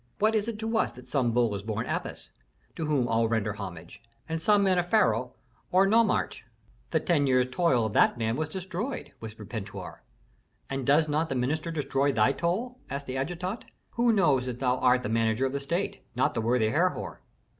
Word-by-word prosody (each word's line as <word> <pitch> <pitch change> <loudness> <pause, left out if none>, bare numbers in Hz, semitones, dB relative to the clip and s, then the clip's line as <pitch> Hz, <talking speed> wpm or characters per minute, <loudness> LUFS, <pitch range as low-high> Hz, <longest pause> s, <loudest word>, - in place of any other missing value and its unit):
What 215 +1 +2
is 215 -1 +1
it 230 -2 -3
to 225 +1 -1
us - - +1
that 125 0 -13
some 130 -5 +1
bull 120 -2 +2
is 100 - -3
born 110 +2 -3
Apis, - - -5 0.4
to 160 - -3
whom 140 -5 +1
all 115 0 +2
render 110 -2 0
homage, 90 -5 -8 0.3
and 160 0 -3
some 205 +3 +4
man 185 -2 +3
a - - +2
pharaoh 125 - +2 0.4
or 185 +2 +5
a - - +3
nomarch?" 225 +2 +2 0.5
"The - - +2
ten 150 -6 +1
years' 130 -1 +2
toil 130 -6 +2
of 110 - -3
that - - +4
man 115 0 0
was 155 +1 -2
destroyed," 190 - -5
whispered 110 -2 -9
Pentuer. 105 -3 -7 0.7
"And 135 -2 -3
does 155 +3 +4
not 155 +2 0
the 135 - -2
minister 150 +6 -1
destroy 140 -3 0
thy 110 0 +3
toil?" 220 - -2
asked 140 +1 -4
the 130 0 -4
adjutant. 180 - -3 0.3
"Who 240 0 +2
knows 150 - +3
that 125 -2 -4
thou 125 -1 +1
art 125 0 +3
the - - -3
manager 115 +2 +1
of 130 - -2
the 140 - -1
state, 175 +8 -2
not 125 - +1
the - - -1
worthy 115 -1 +2
Herhor?" 145 - -1
135 Hz, 205 wpm, -28 LUFS, 115-180 Hz, 0.7 s, or